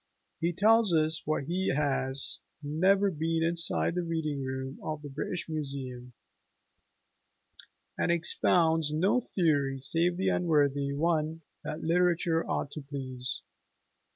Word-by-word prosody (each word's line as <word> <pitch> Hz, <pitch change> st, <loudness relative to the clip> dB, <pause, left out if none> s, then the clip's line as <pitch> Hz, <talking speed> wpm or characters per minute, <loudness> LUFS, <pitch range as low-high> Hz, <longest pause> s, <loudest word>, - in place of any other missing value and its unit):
He 170 Hz, +1 st, +1 dB
tells 210 Hz, +1 st, +4 dB
us 155 Hz, 0 st, +1 dB
that 155 Hz, -2 st, 0 dB
he 185 Hz, +3 st, 0 dB
has 135 Hz, -2 st, 0 dB, 0.2 s
"never 190 Hz, +7 st, +3 dB
been 165 Hz, 0 st, 0 dB
inside 170 Hz, 0 st, 0 dB
the 180 Hz, -, 0 dB
reading 160 Hz, -4 st, -2 dB
room 130 Hz, +1 st, -4 dB
of 155 Hz, -1 st, -4 dB
the 145 Hz, -, -6 dB
British 150 Hz, +5 st, -4 dB
Museum," 135 Hz, -5 st, -5 dB, 1.9 s
and -, -, +2 dB
"expounds 165 Hz, -2 st, +2 dB
no 180 Hz, +10 st, +3 dB, 0.2 s
theory 145 Hz, -7 st, +2 dB
save 170 Hz, +6 st, 0 dB
the 190 Hz, +1 st, +1 dB
unworthy 145 Hz, -6 st, +2 dB
one 160 Hz, +1 st, 0 dB, 0.2 s
that 155 Hz, -, -5 dB
literature 170 Hz, -1 st, +2 dB
ought 140 Hz, -, -1 dB
to 150 Hz, -, -6 dB
please." 130 Hz, -3 st, -5 dB
155 Hz, 125 wpm, -30 LUFS, 140-170 Hz, 1.9 s, tells